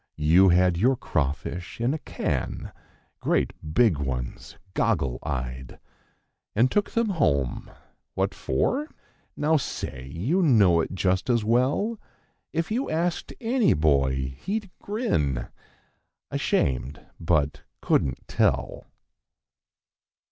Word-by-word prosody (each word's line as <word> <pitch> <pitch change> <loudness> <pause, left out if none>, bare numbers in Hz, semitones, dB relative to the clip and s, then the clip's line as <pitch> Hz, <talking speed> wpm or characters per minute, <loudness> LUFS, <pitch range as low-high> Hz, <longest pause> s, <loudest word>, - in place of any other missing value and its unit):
You 85 +6 +5
had 90 0 +4
your 125 +8 +3
crawfish 80 - -3
in 120 +4 +1
a 155 - -3
can—great - - -3 0.2
big 110 -12 +4
ones, 65 -3 -4 0.2
goggle 65 -3 0
eyed; 65 -2 -5 0.8
And 120 +4 +3
took 205 0 +1
them 230 -1 0
home—what 70 - -2
for? 265 - 0 0.5
Now 155 +2 +3
say; 65 - -5
you 125 - 0
know 105 - +5
it 85 - -4
just 95 +3 0
as 120 -3 +3
well! 135 - +1 0.5
If 165 +5 -2
you 250 +5 -1
asked 170 +2 -1
any 240 -1 +2
boy, 65 -3 +1
he'd 205 -1 -3
grin, 75 - -1 0.8
ashamed, 65 +1 -1
but 80 -3 +1 0.2
couldn't 65 -1 0
tell. - - 0
90 Hz, 105 wpm, -26 LUFS, -, 0.8 s, You